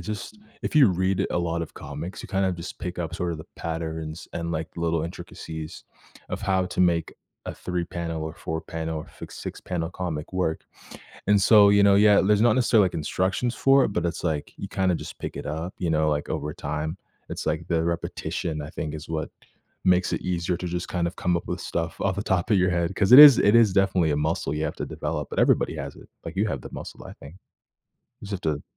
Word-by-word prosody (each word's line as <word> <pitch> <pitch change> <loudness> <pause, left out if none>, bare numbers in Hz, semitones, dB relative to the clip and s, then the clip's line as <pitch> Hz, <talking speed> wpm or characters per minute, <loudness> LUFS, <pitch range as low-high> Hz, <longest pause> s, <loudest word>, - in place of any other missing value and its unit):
just 105 - -6 0.2
if - - -3
you 140 -6 +7
read 95 +1 0
a - - 0
lot 85 -1 -1
of - - -8
comics, 85 +5 -7
you - - -9
kind 95 0 0
of 95 - 0
just 85 +1 -8
pick 90 -1 -5
up 85 -1 -3
sort 90 -1 -2
of 80 - -6
the 80 - -9
patterns 80 -1 -5
and, 85 0 -3
like, 80 0 -3
little 85 -1 0
intricacies 80 -1 -7 0.5
of - - -3
how 95 -2 +1
to 90 - -3
make 85 -2 +2 0.3
a - - -5
3 90 -1 -3
panel, 85 -2 -4
or 80 - -6
4 80 0 -4
pane,l 80 0 -4
or 75 - -6
f - - -19
6 - - -7
panel 85 -2 -3
comic 85 -4 -5
work. 90 -4 -1 0.6
And 105 0 +4
so, 100 0 +7
you 100 0 +5
know, 100 -1 +6
yeah, 105 0 +6
there's 105 +1 +3
not 120 0 +5
necessarily, 115 -5 +4
like, - - -4
instructions 95 +9 -1
for 135 -1 +5
it, - - +1
but 90 -2 0
it's 85 0 -3
like, 80 -4 -2
you 100 - -6
kinda 95 -2 +1
just - - -7
pick - - -6
it - - -6
up, 80 +5 -4
you 85 - -1
know, 80 -1 +2
like, 75 0 -2
over 75 +1 -3
time. 75 +1 -4 0.3
It's - - -5
like 80 +1 -1
the 85 -2 +1
repetition, 85 -2 -3
I 75 - -8
think, 80 -3 -5
is 75 0 -8
what 80 -1 -3 0.5
makes 90 0 +3
it - - -1
easier 90 0 -1
to 90 - -5
just 90 0 -3
kind 85 -2 -1
of 85 - -10
come 90 -1 +1
up - - -4
with - - -4
stuff 80 -1 -3
off 95 -1 0
the 100 - -2
top 95 +1 0
of 100 - +5
your 90 0 +3
head 85 +1 0
'cause 100 +4 +2
it 130 - +12
is 145 -4 +11
it 105 - +4
is 115 -4 +6
definitely 95 -5 +2
a 75 - +1
muscle 75 -2 -1
you 75 +1 -2
have - - -2
to - - -3
develop, - - -4
but - - -5
everybody - - +3
has - - -6
it. - - -15 0.2
Like, - - -7
you 105 - +2
have 70 - -3
the - - -10
muscle, - - -8
I - - -9
think. 70 +4 -13 0.9
You 110 - -9
just - - -6
have 95 - -3 0.2
to 75 - -11
85 Hz, 240 wpm, -25 LUFS, 80-95 Hz, 0.9 s, it